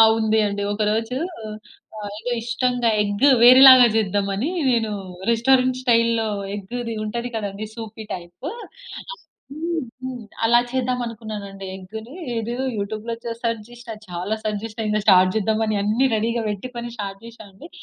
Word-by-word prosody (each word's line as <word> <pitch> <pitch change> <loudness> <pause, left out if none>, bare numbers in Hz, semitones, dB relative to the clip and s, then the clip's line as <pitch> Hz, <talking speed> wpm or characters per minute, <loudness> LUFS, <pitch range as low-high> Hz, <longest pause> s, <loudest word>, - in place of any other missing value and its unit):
ఆ! - - +11 0.2
ఉంది 220 0 +2
అండి. 200 0 -2
ఒకరోజూ 220 +3 -1 0.8
ఆహ్, 205 -1 -6
ఏదో 245 +2 -3
ఇష్టంగా 240 0 0
ఎగ్గు 205 +7 +2
వేరేలాగా 255 0 +10
జేద్దామనీ, 200 - 0 0.2
నేనూ 225 -3 +1 0.4
రెస్టారెంట్ 255 +2 +3
స్టైల్‌లో 230 -2 +2 0.3
ఎగ్గుది 230 +3 -5
ఉంటది 235 +3 -3
కదండీ 205 0 -4
సూపీ 220 -1 -8
టైపు 175 - -9
ఆ! 485 +1 -10 0.4
హ్మ్. 330 +2 -2 0.2
హ్మ్. 255 -2 -5 0.2
అలా 240 +1 +5
చేద్దామనుకున్నానండి 220 -6 -4
ఎగ్గునీ. 220 - -9 0.2
ఇదో 235 +2 -3 0.2
యూట్యూబ్‌లో 215 +3 -3
చె 230 - -3
సర్చ్ 230 -2 -1
జేషినా, 240 -2 -9
చాలా 180 +5 -3
సర్చ్ 210 -1 -2
జేషినా. 225 0 -5
ఇంక 215 - +1
స్టార్ట్ 185 -2 +6
జేద్దామని 220 0 +1
అన్నీ 225 +6 +2
రెడీ‌గా 230 +2 0
బెట్టుకొని, 235 +3 -5
స్టార్ట్ 195 -1 -5
జేషా 230 -2 -12
అండి. 200 - -13
225 Hz, 140 wpm, -22 LUFS, 210-245 Hz, 0.8 s, ఆ